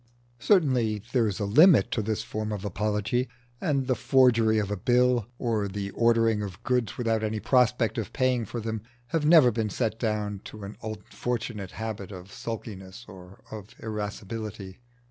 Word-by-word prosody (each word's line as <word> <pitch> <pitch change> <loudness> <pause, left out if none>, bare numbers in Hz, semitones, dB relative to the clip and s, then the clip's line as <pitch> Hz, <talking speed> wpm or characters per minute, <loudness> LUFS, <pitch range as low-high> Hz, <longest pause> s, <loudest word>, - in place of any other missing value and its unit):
Certainly 125 - +2
there 120 -3 +3
is 100 - -3
a 105 - -1
limit 155 - +6
to 110 - 0
this 110 +1 -2
form 110 -1 -4
of 105 -1 -4
apology, 105 +5 -1 0.3
and 140 -3 0
the 130 - +2
forgery 120 -4 +4
of 105 -1 -1
a - - 0
bill, 125 +2 +2
or 110 -5 -1
the 100 0 -4
ordering 115 -1 +2
of 100 +1 -7
goods 125 -3 0
without 115 -2 0
any 110 0 -2
prospect 125 -1 +2
of 105 - -5
paying 130 -3 +1
for 120 - -5
them, 110 -1 -4 0.3
has 165 -2 0
never 155 -6 +7
been 110 -1 -1
set 110 +2 -2
down 105 -3 -1
to 110 -1 -9
an 100 +2 -7
unfortunate 110 -1 -5
habit 110 -3 -5
of 95 0 -10
sulkiness 105 -1 -7
or 95 -1 -13
of 110 +2 -9
irascibility. 105 -2 -6
110 Hz, 165 wpm, -27 LUFS, 105-120 Hz, 0.3 s, never